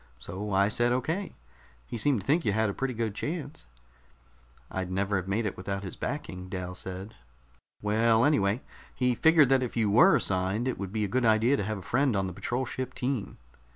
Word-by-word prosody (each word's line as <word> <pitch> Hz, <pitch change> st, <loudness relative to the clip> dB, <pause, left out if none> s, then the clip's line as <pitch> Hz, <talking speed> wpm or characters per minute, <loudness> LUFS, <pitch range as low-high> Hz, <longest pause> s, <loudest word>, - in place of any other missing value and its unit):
So 95 Hz, +10 st, -6 dB
I 100 Hz, +1 st, +4 dB
said 120 Hz, +3 st, +1 dB
okay. 160 Hz, +10 st, -2 dB, 0.5 s
He -, -, -7 dB
seemed 120 Hz, 0 st, +2 dB
to -, -, -14 dB
think 155 Hz, +5 st, +2 dB
you 105 Hz, -, +1 dB
had 110 Hz, -1 st, +1 dB
a -, -, -7 dB
pretty 130 Hz, +1 st, -2 dB
good 110 Hz, -2 st, -1 dB
chance." 150 Hz, -, -5 dB, 1.0 s
"I'd 95 Hz, -1 st, -3 dB
never 95 Hz, +2 st, 0 dB
have 95 Hz, -1 st, -4 dB
made 105 Hz, +4 st, 0 dB
it 105 Hz, -, -2 dB
without 95 Hz, +1 st, -4 dB
his 95 Hz, -, -6 dB
backing," 95 Hz, -10 st, -5 dB
Dal 90 Hz, -1 st, -4 dB
said. 95 Hz, +3 st, -7 dB, 0.7 s
"Well, 110 Hz, +2 st, +3 dB
anyway, 110 Hz, -5 st, +2 dB, 0.3 s
he 125 Hz, -1 st, +2 dB
figured 155 Hz, +1 st, +5 dB
that 135 Hz, -1 st, +4 dB
if 125 Hz, -2 st, -3 dB
you 110 Hz, -3 st, +2 dB
were 165 Hz, -, +7 dB
assigned, 95 Hz, +5 st, 0 dB
it 130 Hz, -, -2 dB
would 100 Hz, -2 st, -4 dB
be 105 Hz, 0 st, 0 dB
a -, -, -2 dB
good 125 Hz, +6 st, 0 dB
idea 115 Hz, +4 st, +4 dB
to 120 Hz, -, -1 dB
have 110 Hz, 0 st, -2 dB
a -, -, -8 dB
friend 130 Hz, +3 st, +1 dB
on 95 Hz, -1 st, +1 dB
the 90 Hz, -, -4 dB
patrol 125 Hz, +8 st, -2 dB
ship 130 Hz, +1 st, -5 dB
team." 125 Hz, -4 st, -3 dB
110 Hz, 210 wpm, -28 LUFS, 95-130 Hz, 1.0 s, were